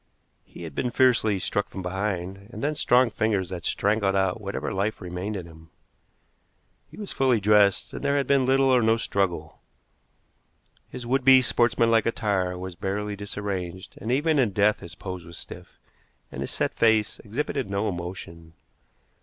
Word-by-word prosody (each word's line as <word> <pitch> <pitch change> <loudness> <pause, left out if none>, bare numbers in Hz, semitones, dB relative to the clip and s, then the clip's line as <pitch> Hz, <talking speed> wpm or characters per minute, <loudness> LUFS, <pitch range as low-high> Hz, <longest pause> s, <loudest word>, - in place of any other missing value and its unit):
He - - -12
had 80 -3 -7
been 125 - -1
fiercely 120 -5 +3
struck 100 +2 -2
from 95 - -7
behind, 95 +1 -3
and 120 - -7
then 150 +2 +1
strong 125 -4 +3
fingers 100 -5 0
had 85 -4 -6
strangled 100 -1 +1
out 95 +2 +1
whatever 100 -1 -4
life 100 +3 -1
remained 90 +4 -5
in 90 - -6
him. 80 -1 -15 1.2
He - - -14
was 205 -2 -6
fully 130 -4 +2
dressed, 105 -1 +3
and - - -6
there 140 0 +2
had 140 - +1
been 135 -1 +2
little 135 0 +4
or 125 - +5
no 110 0 +3
struggle. 90 -8 -2 1.3
His 120 - -8
would 130 +2 +1
be 130 0 +7
sportsmanlike 115 -2 +3
attire 95 -5 0
was 95 0 -6
barely 100 +4 -3
disarranged, 95 -3 -5
and 115 - -3
even 150 +3 +2
in 115 -7 +2
death 105 +2 +3
his 85 - -10
pose 95 -3 -7
was 85 0 -11
stiff, - - -11 0.5
and - - -6
his - - -3
set - - -1
face 110 -2 +2
exhibited 130 +2 -3
no 100 +2 -1
emotion. 85 -3 -6
105 Hz, 170 wpm, -25 LUFS, 95-120 Hz, 1.3 s, be